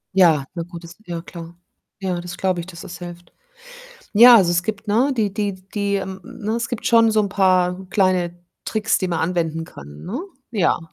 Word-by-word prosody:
Ja, 160 -7 +5
na 170 - -4
gut, 170 0 -10
das 170 +1 -11
ja 170 -1 -4
klar. 170 -2 -10 0.4
Ja, 185 -3 -2
das 175 0 -8
glaube 185 -2 0
ich, 170 - -6
dass 170 -3 -10
das 180 -2 -9
hilft. 175 -1 -10 0.8
Ja, 235 +2 +9
also 175 -4 +3
es 175 0 +1
gibt, 215 +2 -4
ne 240 +7 +2
die 210 -4 0
die 205 -2 -1 0.2
die 200 -1 0
ähm, 190 -1 -4
ne? 225 -3 -5
Es 235 0 -2
gibt 240 - -5
schon 230 -1 +5
so 215 - +3
'n 205 - +1
paar 185 -1 +2
kleine 180 -3 +1 0.2
Tricks, 220 0 0
die 185 - -2
man 170 - -1
anwenden 165 -1 -1
kann, 75 - -12
ne? 215 +8 -4 0.3
Ja, 195 -7 +2
185 Hz, 205 wpm, -21 LUFS, 175-210 Hz, 0.8 s, Ja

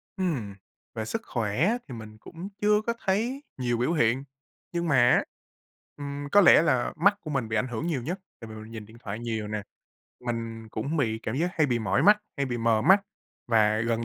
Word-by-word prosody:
Ừm, 140 - -2 0.4
về 110 -1 -3
sức 225 - -3
khỏe 110 +1 -1
á 235 +4 +2
thì 130 - -8
mình 110 -1 -10
cũng 170 - -9
chưa 210 0 +4
có 235 +1 -1
thấy 235 +9 0
nhiều 120 -2 0
biểu 125 +8 +1
hiện, 125 -2 +2 0.5
nhưng 170 -1 -1
mà 145 - +3 0.2
á, - - +4 0.7
ừm, 145 0 -5
có 205 - +7
lẽ 175 - +8
là 130 -7 +1
mắt 200 +5 +4
của 155 - -7
mình 135 -6 -1
bị 110 - -2
ảnh 105 - 0
hưởng 125 +7 -3
nhiều 150 -7 -1
nhất. 175 +10 -4 0.2
Tại 115 - -9
vì 110 - -8
mình 110 +1 -10
nhìn 110 -2 -7
điện 110 +2 -15
thoại 105 +1 -5
nhiều 110 -3 -3
nè, 105 -1 -3 0.6
mình 115 -2 -4
cũng 140 +10 -3
bị 110 -6 0
cảm 110 - -3
giác 170 +5 +1
hay 155 - +3
bị 120 -3 +1
mỏi 120 +4 +1
mắt, 210 +3 +7 0.2
hay 140 -2 0
bị 120 -1 -2
mờ 115 -1 +2
mắt. 190 - +6 0.4
Và 110 -2 +3
gần 115 0 0
125 Hz, 220 wpm, -27 LUFS, 110-170 Hz, 0.7 s, lẽ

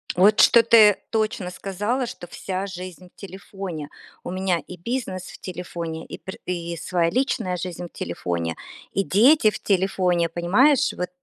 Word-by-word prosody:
Вот 200 +4 +5
что 235 -1 +7
ты 215 -3 +6
точно 215 -5 -1
сказала, 210 +7 -2
что 175 - -8
вся 190 +2 -4
жизнь 185 -1 -9
в - - -58
телефоне. 190 -5 -7 0.3
У - - -5
меня 185 -2 0
и 180 - -8
бизнес 190 -2 -4
в - - -11
телефоне, 170 -3 -6
и - - -8
пр 190 - -9
и 170 -1 -3
своя 170 0 0
личная 185 -8 0
жизнь 175 -1 -5
в - - -10
телефоне, 85 -1 -3 0.4
и 195 - 0
дети 225 +3 +5
в - - -7
телефоне, 185 -3 +1
понимаешь, 205 - +3
вот? 180 0 -4
185 Hz, 160 wpm, -23 LUFS, 175-205 Hz, 0.4 s, что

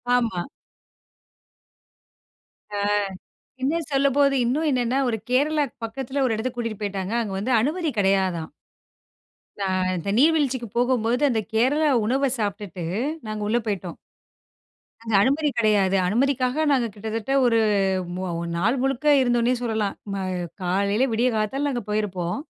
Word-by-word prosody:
ஆமா. 225 -8 0 2.3
ஆ - - -1 0.8
இன்னும் 315 +4 -1
சொல்லும்போது 275 0 +3
இன்னும் 295 +7 0
என்னன்னா, 250 0 +1
ஒரு 225 - -1
கேரளாக்கு 290 +3 +1
பக்கத்தில 265 +4 -3
ஒரு 240 - +1
இடத்துக்கு 240 +3 -4
கூட்டிட்டு 230 -3 -4
போயிட்டாங்க. 200 0 -3
அங்க 205 -3 -5
வந்து 245 +6 0
அனுமதி 315 +5 -1
கிடையாதாம். 190 -4 +1 1.1
நான் 185 -1 0
இந்த 170 +3 -4
நீர் 310 +6 +5
வீழ்ச்சிக்கு 260 -5 0
போகும்போது 245 0 +1
அந்த 225 -4 +1
கேரளா 280 +7 +3 0.2
உணவ 270 +4 +1
சாப்பிட்டுட்டு, 200 -4 -4 0.4
நாங்க 215 0 -4
உள்ள 225 +3 +2
போயிட்டோம். 185 -4 -3 1.1
அங்க 225 -1 -4
அனுமதி 295 +4 +2
கிடையாது. 205 -4 +3
அனுமதிக்காக 255 +7 +1
நாங்க 255 -4 +2
கிட்டத்தட்ட 220 +4 -3
ஒரு 235 -2 +3 0.6
மு 185 - -4 0.3
நாள் 225 +10 +1
முழுக்க 270 +1 -1 0.2
இருந்தோன்னே 240 -1 +2
சொல்லலாம். 220 -4 -1 0.2
ம - - -2 0.5
காலையில 200 +7 +1
விடிய 235 +3 +2
காத்தால 270 +7 -1
அங்க 240 -3 -3
போயிருப்போம். 190 -5 -2
235 Hz, 125 wpm, -24 LUFS, 205-270 Hz, 2.3 s, நீர்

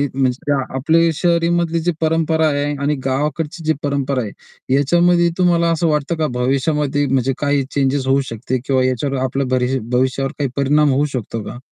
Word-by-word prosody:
म्हणजे 135 +2 0 0.2
आपल्या 165 +4 +3
शहरीमधली 170 0 +1
जी 175 +2 0
परंपरा 160 0 +2
आहे 145 -1 0 0.2
आणि 150 +1 +1
गावाकडची 150 +4 -2
जी 160 - +3
परंपरा 140 -2 -1
आहे 115 +4 -5
याच्यामध्ये 175 +4 +3
तुम्हाला 170 -2 +3
असं 165 +1 +1
वाटतं 150 +2 0
का 155 -1 0
भविष्यामध्ये 145 +2 0
म्हणजे 135 0 +1
काही 145 -1 +1
चेंजस 135 -1 0
होऊ 135 +1 +3
शकते 125 +3 -3
किंवा 130 -2 +2
याच्यावर 130 +2 -1
आपल्या 135 +1 -1
भरि 130 +1 0
भविष्यावर 130 +2 0
काही 140 - 0
परिणाम 145 +1 +3
होऊ 145 +3 +2
शकतो 115 -2 -4
का? - - -8
145 Hz, 165 wpm, -18 LUFS, 135-160 Hz, 0.2 s, आपल्या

